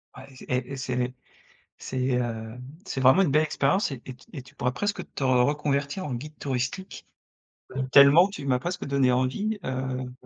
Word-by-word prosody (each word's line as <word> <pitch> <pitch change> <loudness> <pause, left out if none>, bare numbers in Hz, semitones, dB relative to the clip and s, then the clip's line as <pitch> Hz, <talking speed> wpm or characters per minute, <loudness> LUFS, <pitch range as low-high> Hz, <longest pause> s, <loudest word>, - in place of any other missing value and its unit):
Ouais. - - -11 0.2
Et 125 +1 -2
et - - -3
c'est 130 -1 -3
les 125 0 -1 0.7
c'est 130 -1 -4
hem 120 -1 -2 0.2
c'est 135 - -4
vraiment 130 +9 +6
une 150 - +2
belle 155 +2 +4
expérience 155 +4 +1
et 130 -4 -6
t 130 - -10
et - - -7
tu 125 - -21
et 140 -6 -7
tu 135 +2 -18
pourrais 125 -2 -1
presque 205 +9 -2
te - - -5
reconvertir 140 +5 +1
en 130 - -3
guide 150 +5 -7
touristique, 130 +7 -4 0.9
tellement 145 +7 +8
tu 195 -8 -8
m'as 125 -2 +2
presque 175 +5 -4
donné 140 -2 +2
envie, 200 - 0
heu, 130 -1 -3
135 Hz, 185 wpm, -26 LUFS, 125-150 Hz, 0.9 s, tellement